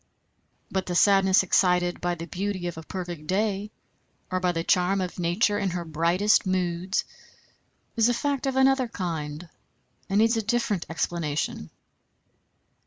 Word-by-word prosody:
But 190 Hz, -1 st, -2 dB
the 175 Hz, -, -2 dB
sadness 190 Hz, 0 st, +5 dB
excited 180 Hz, -1 st, +2 dB
by 175 Hz, 0 st, 0 dB
the 165 Hz, 0 st, -7 dB
beauty 185 Hz, +2 st, -3 dB
of 175 Hz, -, -3 dB
a 160 Hz, -, -7 dB
perfect 175 Hz, -2 st, -7 dB
day, 200 Hz, +2 st, 0 dB, 0.6 s
or 185 Hz, -, 0 dB
by 180 Hz, -1 st, +1 dB
the 165 Hz, -1 st, -2 dB
charm 185 Hz, +3 st, +2 dB
of 180 Hz, -1 st, -4 dB
nature 205 Hz, +5 st, +1 dB
in 195 Hz, -, 0 dB
her 175 Hz, -1 st, -4 dB
brightest 170 Hz, +7 st, +2 dB
moods, 185 Hz, 0 st, -1 dB, 0.9 s
is 230 Hz, 0 st, +4 dB
a -, -, +2 dB
fact 280 Hz, +1 st, -1 dB
of 265 Hz, -, -1 dB
another 265 Hz, -1 st, +3 dB
kind, 165 Hz, -6 st, -5 dB, 0.6 s
and 195 Hz, -, +1 dB
needs 225 Hz, +2 st, +4 dB
a -, -, +1 dB
different 220 Hz, -4 st, -1 dB
explanation. 160 Hz, -, -2 dB
185 Hz, 150 wpm, -26 LUFS, 170-205 Hz, 0.9 s, sadness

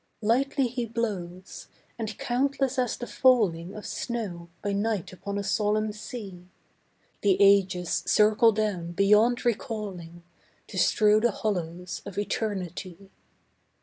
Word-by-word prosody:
Lightly 265 Hz, +5 st, +2 dB
He 240 Hz, -1 st, -3 dB
blows, 190 Hz, -6 st, -5 dB, 0.3 s
and 220 Hz, -2 st, -4 dB
countless 270 Hz, +1 st, 0 dB
as 250 Hz, -2 st, 0 dB
the 245 Hz, -, -5 dB
falling 200 Hz, -10 st, +2 dB
Of 215 Hz, -, -8 dB
snow 195 Hz, -8 st, -4 dB
by 205 Hz, -, -1 dB
night 205 Hz, -2 st, -1 dB
upon 200 Hz, +2 st, -5 dB
a 200 Hz, -, -2 dB
solemn 210 Hz, +2 st, +1 dB
sea, 205 Hz, -4 st, -8 dB, 0.7 s
The 195 Hz, -2 st, +3 dB
ages 190 Hz, -3 st, +3 dB
circle 215 Hz, +2 st, +5 dB
down 200 Hz, -6 st, -2 dB
beyond 210 Hz, +6 st, +3 dB
recalling, 200 Hz, -8 st, -3 dB, 0.5 s
To -, -, -4 dB
strew 210 Hz, 0 st, +4 dB
the 240 Hz, +2 st, +3 dB
hollows 180 Hz, -4 st, -3 dB
of 200 Hz, -, -9 dB
Eternity. 195 Hz, -2 st, -4 dB
210 Hz, 120 wpm, -27 LUFS, 185-230 Hz, 0.7 s, circle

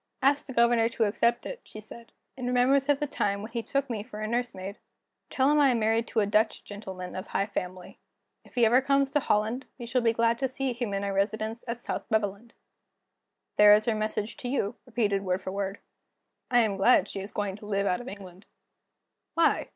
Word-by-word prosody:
'Ask 280 Hz, +2 st, +3 dB
the 265 Hz, -, -6 dB
Governor 235 Hz, -1 st, +4 dB
to 230 Hz, -, 0 dB
accept 235 Hz, +3 st, +1 dB
it,' -, -, -6 dB
she 215 Hz, -, -11 dB
said, 230 Hz, +2 st, -11 dB, 0.2 s
'in 255 Hz, -2 st, -4 dB
remembrance 260 Hz, +3 st, +3 dB
of 285 Hz, -1 st, +4 dB
the 295 Hz, -, 0 dB
time 200 Hz, -7 st, -1 dB
when 220 Hz, -, -8 dB
he 235 Hz, 0 st, -2 dB
took 275 Hz, +5 st, -1 dB
me 230 Hz, -5 st, -3 dB
for 210 Hz, 0 st, -9 dB
a 215 Hz, -, -2 dB
nursemaid. 215 Hz, -4 st, -3 dB, 0.5 s
Tell 265 Hz, +2 st, +2 dB
him 300 Hz, -, +4 dB
I 285 Hz, -2 st, +6 dB
am 240 Hz, -2 st, +2 dB
married 225 Hz, +1 st, +1 dB
to 225 Hz, -, +1 dB
a -, -, +2 dB
Dutch 215 Hz, +2 st, +1 dB
gentleman 190 Hz, -3 st, -8 dB
of 185 Hz, -, -5 dB
high 195 Hz, -, 0 dB
family. 185 Hz, -3 st, -6 dB, 0.4 s
If -, -, -20 dB
he 240 Hz, -2 st, +5 dB
ever 245 Hz, +4 st, +5 dB
comes 275 Hz, 0 st, +2 dB
to 295 Hz, -, +3 dB
Holland, 225 Hz, +2 st, 0 dB
we 240 Hz, -, -7 dB
shall 245 Hz, +2 st, 0 dB
be 230 Hz, -1 st, +3 dB
glad 230 Hz, 0 st, +1 dB
to 270 Hz, -, +1 dB
see 260 Hz, 0 st, -2 dB
him 240 Hz, -3 st, -3 dB
in 195 Hz, -, -2 dB
our 200 Hz, 0 st, -1 dB
residence 220 Hz, +3 st, -1 dB
at 235 Hz, 0 st, -2 dB
South 240 Hz, -, -5 dB
Beveland.' 220 Hz, +1 st, -1 dB, 1.0 s
There 210 Hz, 0 st, +9 dB
is 215 Hz, 0 st, 0 dB
her 230 Hz, -, +2 dB
message 215 Hz, 0 st, -3 dB
to 250 Hz, -, -6 dB
you, 240 Hz, -4 st, -1 dB
repeated 210 Hz, -5 st, 0 dB
word 185 Hz, 0 st, -1 dB
for 190 Hz, -, -4 dB
word." 195 Hz, 0 st, -3 dB, 0.7 s
"I 245 Hz, -1 st, +5 dB
am 210 Hz, -3 st, 0 dB
glad 215 Hz, +6 st, +5 dB
she -, -, -5 dB
is 195 Hz, +2 st, -6 dB
going 205 Hz, -2 st, -2 dB
to 210 Hz, -, -11 dB
live 200 Hz, -1 st, 0 dB
out 240 Hz, +4 st, 0 dB
of 245 Hz, -, -10 dB
England." 190 Hz, -4 st, -10 dB, 0.9 s
"Why? 335 Hz, 0 st, +3 dB
225 Hz, 220 wpm, -28 LUFS, 205-245 Hz, 1.0 s, There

